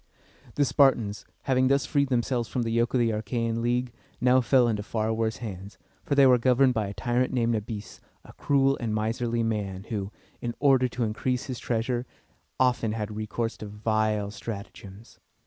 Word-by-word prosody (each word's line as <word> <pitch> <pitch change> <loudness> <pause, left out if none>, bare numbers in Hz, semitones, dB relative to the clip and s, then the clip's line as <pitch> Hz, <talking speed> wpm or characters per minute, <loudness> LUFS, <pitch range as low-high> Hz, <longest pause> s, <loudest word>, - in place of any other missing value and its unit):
The 145 - +3
Spartans, 125 -8 +2 0.2
having 130 -1 +2
thus 140 0 +2
freed 140 -2 +1
themselves 120 -1 0
from 125 - -1
the 115 - -2
yoke 120 +2 +1
of - - +3
the 115 -1 +2
Achæan 115 +1 -2
League, 120 +1 -1 0.3
now 125 +1 +4
fell 125 +1 +4
into 105 -3 0
far 110 +1 -1
worse 110 0 -1
hands, 100 0 -8 0.3
for 140 - -1
they 140 -1 +7
were 125 -2 +6
governed 130 +1 +4
by 110 -3 -1
a 100 - -6
tyrant 125 +1 0
named 120 -2 +1
Na´bis, 105 -1 -5 0.3
a - - -13
cruel 135 -1 +2
and 110 -3 -2
miserly 115 +2 -1
man, 100 -4 -2
who, 100 -3 -3 0.3
in 120 -1 -3
order 135 -3 +4
to 120 0 -3
increase 125 +4 -1
his 130 -4 -5
treasure, 120 +1 -1 0.5
often 125 -4 +2
had 105 -1 -4
recourse 110 +2 -3
to 105 - -7
vile 105 0 -1
stratagems. 100 -1 -9
115 Hz, 180 wpm, -27 LUFS, 110-125 Hz, 0.5 s, they